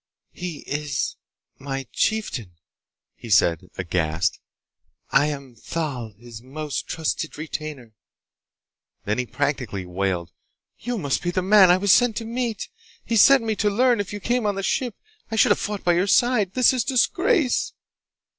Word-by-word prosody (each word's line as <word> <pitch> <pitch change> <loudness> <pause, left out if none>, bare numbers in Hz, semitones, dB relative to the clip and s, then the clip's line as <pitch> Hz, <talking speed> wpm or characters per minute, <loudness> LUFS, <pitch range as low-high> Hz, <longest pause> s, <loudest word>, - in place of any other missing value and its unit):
"He 175 -4 -6
is... 145 -3 -2 0.4
my 135 -1 -4
chieftain," 140 - -1 0.6
he 115 - -11
said, 90 -3 +3
aghast. 85 -1 -1 0.7
"I... 145 +2 +4
am 140 -4 -6
Thal, 125 -2 -4
his 115 0 -11
most 145 +3 -5
trusted 160 -1 -3
retainer." 150 -6 -6 1.1
Then 105 +4 0
he 125 - -2
practically 130 -10 -2
wailed, 90 -2 -2 0.5
"You 245 +1 -3
must 140 -8 -1
be 175 - -2
the 185 +1 -1
man 195 -1 +7
I 180 - +6
was 200 +1 +2
sent 245 0 +4
to 230 - -3
meet! 230 -2 -3 0.4
He 230 - -1
sent 265 +4 +7
me 220 -1 -1
to 210 - +2
learn 240 +2 +3
if 205 - -3
you 205 - -5
came 240 +1 0
on 205 - 0
the 195 - -3
ship! 245 +2 -1 0.3
I 225 - -3
should 220 - +4
have - - +3
fought 205 -1 -4
by 175 - +3
your 180 +3 +1
side! 210 -3 +3
This 255 0 +5
is 250 -3 0
disgrace!" 280 - +1
165 Hz, 160 wpm, -23 LUFS, -, 1.1 s, man